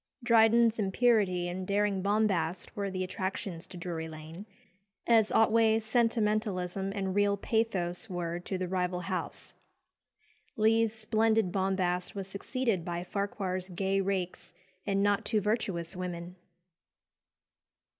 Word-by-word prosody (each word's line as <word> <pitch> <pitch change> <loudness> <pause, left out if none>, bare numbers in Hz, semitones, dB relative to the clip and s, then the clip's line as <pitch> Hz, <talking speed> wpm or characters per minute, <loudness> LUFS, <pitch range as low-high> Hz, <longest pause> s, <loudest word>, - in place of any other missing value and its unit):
'" - - -28
Dryden's 230 0 +5
impurity 195 -3 +2
and 185 +1 -4
daring 200 -1 +1
bombast 195 -4 0
were 200 -1 -2
the 185 -1 -2
attractions 185 -2 -4
to 180 - -10
Drury 170 -2 -4
Lane, 160 +5 -9 0.6
as 225 -2 +4
Otway's 225 0 +4
sentimentalism 210 -5 0
and 190 -2 -2
real 205 0 +2
pathos 200 -4 -1
were 175 -1 -3
to 185 +2 -4
the 185 0 -2
rival 180 -1 -1
house. 185 +1 -4 1.0
Lee's 225 +1 +3
splendid 220 -2 +2
bombast 190 0 0
was 195 -1 -4
succeeded 200 0 -2
by 175 0 -3
Farquhar's 190 -1 -3
gay 195 +2 0
rakes 185 -2 -3 0.3
and 195 0 +2
not 205 0 +2
too 220 - +1
virtuous 195 -5 -1
women. 180 -1 -5
195 Hz, 125 wpm, -30 LUFS, 180-215 Hz, 1.0 s, Dryden's